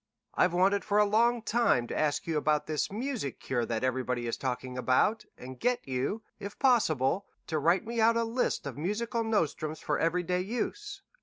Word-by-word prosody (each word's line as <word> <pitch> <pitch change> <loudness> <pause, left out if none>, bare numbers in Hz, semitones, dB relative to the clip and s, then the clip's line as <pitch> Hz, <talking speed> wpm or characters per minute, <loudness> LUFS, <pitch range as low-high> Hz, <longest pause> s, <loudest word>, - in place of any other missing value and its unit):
I've 180 - +3
wanted 195 +3 +3
for 205 -1 0
a 210 - +6
long 230 +3 +2
time 230 - +2
to - - -6
ask 150 -2 0
you 165 - -2
about 150 0 +1
this 155 +2 -2
music 230 - -3
cure 120 -3 -2
that 115 0 -2
everybody 125 -1 -1
is 115 - -1
talking 130 -1 -4
about, 130 - +2
and 130 0 -10
get 245 - 0
you, 135 - -2 0.2
if 200 +1 -7
possible, 195 - +2 0.2
to 160 -2 -1
write 170 +8 +2
me 230 0 -2
out 230 +1 +4
a 230 - +2
list 230 +2 -1
of 140 -1 -6
musical 230 +7 -1
nostrums 160 -7 -1
for - - -1
every 175 +2 +1
day 180 +1 0
use. 395 - -4
180 Hz, 190 wpm, -29 LUFS, 135-225 Hz, 0.2 s, a